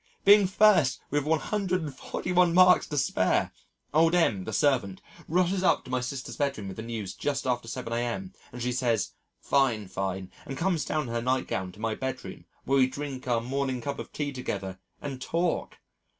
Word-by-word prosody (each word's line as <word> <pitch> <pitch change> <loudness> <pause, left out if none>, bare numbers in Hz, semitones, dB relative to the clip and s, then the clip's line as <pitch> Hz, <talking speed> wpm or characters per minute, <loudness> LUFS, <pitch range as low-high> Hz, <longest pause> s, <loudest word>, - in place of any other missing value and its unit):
being 200 -1 +8
first 185 -9 +4
with 145 0 +1
141 180 0 0
marks 185 0 +6
to 150 - -4
spare. 130 -8 +1 0.4
Old 165 +2 +4
M 105 - +2
[the - - -4
servant] 125 -10 +1 0.3
rushes 180 +3 +1
up 185 - +2
to 130 - -9
my 130 -1 0
sister's 130 +1 -5
bedroom 140 -8 -1
with 95 - -8
the - - -4
news 110 -5 -5
just 145 -2 -2
after 120 -2 -1
7 115 -1 -5
a.m., 115 -6 -2 0.2
and 120 0 -6
she 125 - 0
says, 120 -4 0 0.3
"Fine, 120 -8 +1
fine," 95 0 -3 0.2
and 135 - -5
comes 175 -2 0
down 155 -1 -1
in 125 - -7
her 120 - 0
nightgown 125 -7 -1
to 100 - -16
my 110 0 -1
bedroom, 130 +3 -5 0.2
where 135 +1 +2
we 130 - +5
drink 130 -1 -6
our 120 -2 +2
morning 130 +1 -2
cup 140 +4 -4
of - - -7
tea 145 -1 -3
together 95 -7 -4 0.2
and 135 -3 -5
talk! 170 +4 -1
130 Hz, 180 wpm, -28 LUFS, 115-155 Hz, 0.4 s, being